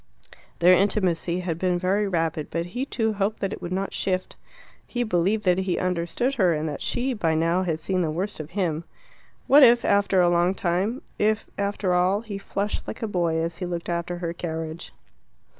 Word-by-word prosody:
Their 175 +1 +6
intimacy 180 -2 +1
had 170 -2 -3
been 180 -1 +1
very 195 +3 +1
rapid, 165 -4 -1
but 170 +1 -2
he 255 +2 -2
too 220 -4 0
hoped 200 +1 -1
that 195 +1 -2
it - - -8
would 175 - -5
not 195 +1 -2
shift. 185 -1 -2 0.5
He 245 0 -1
believed 205 +1 +1
that 180 0 +3
he 185 -2 -1
understood 180 +8 -1
her, 175 -3 +4
and 155 +1 -2
that 145 -2 -5
she, 260 +2 -1
by 165 -8 0
now, 165 +3 +2
had 165 -4 -1
seen 185 +3 0
the 165 - 0
worst 185 +6 -3
of 155 -1 -6
him. 165 -4 0 0.6
What 290 +2 +7
if 240 -2 +6
after 200 -1 +3
a 175 - +5
long 175 +2 +2
time 190 +9 -1 0.2
if 215 +1 +1
after 200 -2 -1
all 185 +3 +2
he 210 -3 -6
flushed 200 +1 -3
like - - -6
a - - 0
boy 170 -5 0
as 165 +1 -2
he 180 0 -4
looked 175 -1 -4
after 170 +1 -2
her 170 -1 -3
carriage. 160 -1 -5
180 Hz, 200 wpm, -25 LUFS, 170-200 Hz, 0.6 s, What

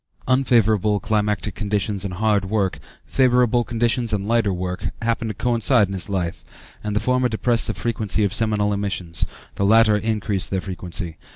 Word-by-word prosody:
Unfavorable 110 -6 +3
climatic 105 -1 -1
conditions 105 -1 -1
and 95 -3 -4
hard 105 0 +1
work, 100 -1 -1 0.3
favorable 125 -2 +3
conditions 120 0 0
and 100 -1 -1
lighter 115 -3 +2
work, 90 0 -3 0.2
happen 115 0 0
to 110 - -3
coincide 120 -1 +2
in 100 - -7
his 95 -1 -1
life, 90 -4 -3 0.4
and 105 -1 -3
the - - +3
former 125 +1 +1
depress 115 +1 +1
the - - -2
frequency 110 -3 -1
of 100 -1 0
seminal 105 -2 +1
emissions; 95 -4 -2 0.3
the - - 0
latter 110 +1 +5
increase 105 -2 -1
their 95 - -1
frequency. 90 -3 -6
105 Hz, 165 wpm, -22 LUFS, 100-115 Hz, 0.4 s, latter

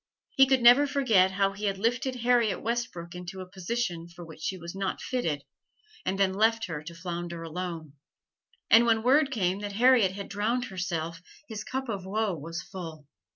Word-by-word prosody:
He 270 -1 +5
could 265 -2 +3
never 250 +5 +8
forget 230 -10 +3
how 195 +1 +1
he 200 +2 -5
had 195 -1 0
lifted 245 +5 0
Harriet 235 -5 +2
Westbrook 230 -7 -3
into 180 +1 -7
a 185 - -6
position 180 -2 -3
for 170 0 -11
which 160 -1 -12
she 190 - -2
was 170 -1 -8
not 195 0 -2
fitted 160 - -2 0.6
and 190 +1 -1
then 190 -1 +3
left 225 +3 +2
her 160 -5 -5
to 170 +1 -8
flounder 170 -1 -5
alone. 165 -2 -5 0.8
And 235 +1 +7
when 225 -1 +3
word 275 +4 +4
came 195 -7 0
that 205 -1 -5
Harriet 235 -3 +5
had 200 0 -6
drowned 225 +5 -1
herself, 170 -4 -4 0.3
his 215 -2 -6
cup 265 +1 -4
of 200 -5 -3
woe 215 0 0
was 165 +1 -6
full. 165 -6 -8
195 Hz, 185 wpm, -28 LUFS, 175-235 Hz, 0.8 s, never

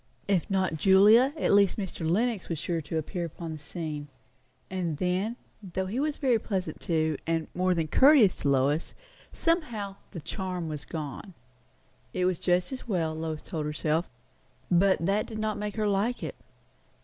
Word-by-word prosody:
If 190 -5 +1
not 185 -4 +1
Julia, 205 - +6
at - - +2
least 200 -2 +4
Mr. 185 -5 -3
Lenox 220 +2 0
was 165 - -2
sure 170 +1 -2
to 160 +2 -4
appear 175 +3 -3
upon 165 0 -7
the 155 - -6
scene; 150 -1 -5 0.6
and 175 -5 -2
then, 185 +7 0 0.3
though 190 -1 -3
he 210 +7 -3
was 300 +1 0
very 255 -5 +2
pleasant 190 -4 -3
too, 160 -4 0
and 165 -1 0
more 185 0 +1
than 165 -2 0
courteous 260 - +6
to 140 - 0
Lois, 140 +4 +1 0.4
somehow 235 - -1
the 175 - -7
charm 180 +1 -4
was 150 -2 -5
gone. 160 +4 -6 0.8
It 180 - +1
was 185 -2 +1
just 180 +4 +1
as 260 -2 -7
well, 165 -7 0
Lois 160 -1 -4
told 155 -2 -4
herself; 155 +2 -1 0.6
but 185 -1 +4
that 200 +3 +1
did 220 - -6
not 215 -1 -2
make 210 -1 -4
her 215 -1 0
like 205 +5 0
it. - - -4
185 Hz, 175 wpm, -28 LUFS, 160-210 Hz, 0.8 s, Julia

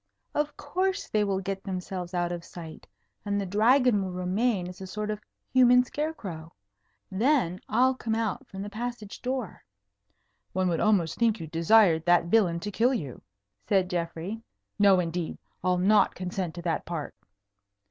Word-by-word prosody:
Of 295 0 -1
course, 375 +6 -1
they 210 -1 +1
will 195 -2 0
get 195 0 -4
themselves 185 -1 -5
out 175 0 0
of 175 -1 -5
sight, 165 -2 -10 0.4
and 205 -1 -1
the 200 - -2
Dragon 225 +3 +4
will 185 - -4
remain 185 +2 0
as 180 +1 -10
a 190 - -6
sort 210 +3 -3
of 210 0 -5 0.3
human 250 -1 +6
scarecrow. 215 - -5 0.6
Then 205 - +2
I'll 255 +4 +4
come 225 -3 -2
out 225 -3 -2
from 195 0 -7
the 205 - -6
passage 230 -1 -6
door." 255 -5 -4 0.9
"One 185 0 +1
would 165 - 0
almost 195 -7 +2
think 225 -3 +2
you 165 - -5
desired 165 +1 +4
that 175 -1 +4
villain 175 -3 +3
to 205 - -4
kill 245 +6 +2
you," 140 - -5 0.5
said 190 -2 +2
Geoffrey. 175 +5 -3 0.4
"No, 200 -2 +6
indeed. 170 -1 -2 0.3
I'll 180 0 +2
not 200 +4 +4
consent 180 -2 -4
to 175 - -7
that 170 -2 -1
part." 165 -4 -5
195 Hz, 165 wpm, -27 LUFS, 175-225 Hz, 0.9 s, human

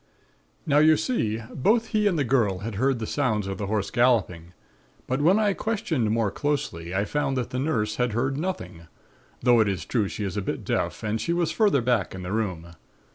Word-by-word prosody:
"Now 145 -2 +3
you 155 0 +6
see, 115 - -1
both 225 - +2
he 215 -1 +2
and 180 -5 +1
the 145 - +2
girl 115 -7 +1
had 115 - -4
heard 130 +6 +1
the 115 - -4
sounds 110 -6 0
of 95 +1 -5
the 100 - -3
horse 105 -1 -1
galloping; 95 -9 +1 0.5
but 130 +3 -1
when 175 +7 +5
I 210 -2 +2
questioned 175 - -1
more 110 -2 +1
closely 140 - -2
I 100 +2 +1
found 135 +2 -1
that 125 - -3
the 125 - -2
aunt 115 -7 0
had 125 -2 0
heard 130 +4 0
nothing, 145 - -5 0.6
though 120 -1 +5
it 110 - +4
is 90 -5 -2
true 110 -5 0
she 105 - -5
is 95 -3 -3
a 105 - -1
bit - - -4
deaf, - - -2
and 110 +1 -1
she 170 - 0
was 170 -2 0
further 200 - +2
back 115 -8 0
in 95 - -7
the 90 - -5
room. 90 -6 -2
120 Hz, 215 wpm, -25 LUFS, 105-150 Hz, 0.6 s, you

